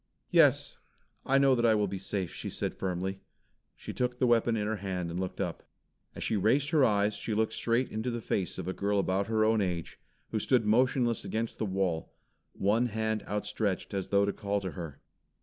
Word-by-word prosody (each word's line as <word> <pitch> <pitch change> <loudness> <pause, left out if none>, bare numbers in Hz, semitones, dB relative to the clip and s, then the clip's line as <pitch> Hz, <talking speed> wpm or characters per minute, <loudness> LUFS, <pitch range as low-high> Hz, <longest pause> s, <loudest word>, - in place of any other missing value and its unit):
"Yes, - - +4 0.5
I 135 - +4
know 135 -1 +5
that 120 -2 +1
I 115 -2 +5
will 105 -1 +2
be 95 0 -4
safe," 95 -2 -3
she - - -5
said - - -3
firmly. 95 +1 -3 0.6
She - - -8
took 125 0 -1
the 130 - +2
weapon 120 -1 +3
in 105 - -1
her 110 +1 -1
hand 90 -3 -3
and 85 - -3
looked 95 -1 -4
up. - - -2 0.5
As - - -5
she 110 - 0
raised 125 - +2
her 155 -4 +4
eyes, 105 -2 +3
she 105 +1 -3
looked 110 0 +1
straight 120 +2 0
into 110 +3 -2
the 120 -1 -2
face 100 -4 -2
of 95 -2 -5
a 95 - -1
girl 100 +1 0
about 100 0 +1
her 110 -1 +2
own 110 -1 +3
age, 90 -4 -3 0.3
who 110 - 0
stood 120 +1 +2
motionless 120 +1 +2
against 115 +1 -3
the 110 - 0
wall, 95 -4 -1 0.4
one 110 +5 +2
hand 110 -1 -1
outstretched 105 -1 -2
its 95 -2 -2
though 100 0 +3
to 100 - -1
call 100 -1 -1
her. 85 -6 -6
105 Hz, 205 wpm, -30 LUFS, 95-115 Hz, 0.6 s, know